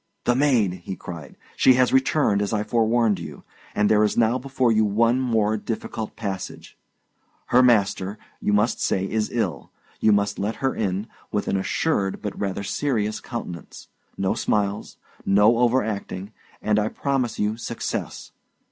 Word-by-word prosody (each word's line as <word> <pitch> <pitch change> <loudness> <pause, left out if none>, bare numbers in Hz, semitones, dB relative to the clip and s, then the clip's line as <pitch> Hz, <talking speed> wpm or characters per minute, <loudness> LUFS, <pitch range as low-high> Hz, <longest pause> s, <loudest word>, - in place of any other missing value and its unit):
"The 125 - +3
maid!" 125 -8 +2
he 95 - -4
cried. 80 -6 -9 0.2
"She 130 - +5
has 130 0 +3
returned, 130 -5 +3
as 105 +2 -1
I 105 -1 +1
forewarned 115 -2 +2
you, - - -9 0.3
and 105 0 +3
there 105 0 +4
is 105 - 0
now 120 +2 +3
before 130 -2 +1
you 110 0 +3
one 115 +4 +2
more 110 -4 +1
difficult 110 0 -5
passage. 100 -4 -6 0.7
Her 125 - +6
master, 100 -4 +2 0.2
you - - 0
must 105 +3 +2
say, 95 0 0
is 110 0 -1
ill; 100 -11 -2 0.3
you 110 - +4
must 100 0 +1
let 105 +3 -1
her 135 +2 -1
in, 100 0 -2 0.3
with 105 - -1
an - - 0
assured 95 +1 0
but 105 -2 -5
rather 100 0 -2
serious 110 -1 -1
countenance; 90 -8 -8 0.3
no 95 -1 +1
smiles, 105 0 -1 0.3
no 105 +4 +4
overacting, 110 -5 0 0.3
and 105 0 +2
I 105 - +1
promise 130 0 -1
you 105 +1 0
success! 115 0 -5
110 Hz, 155 wpm, -24 LUFS, 100-120 Hz, 0.7 s, Her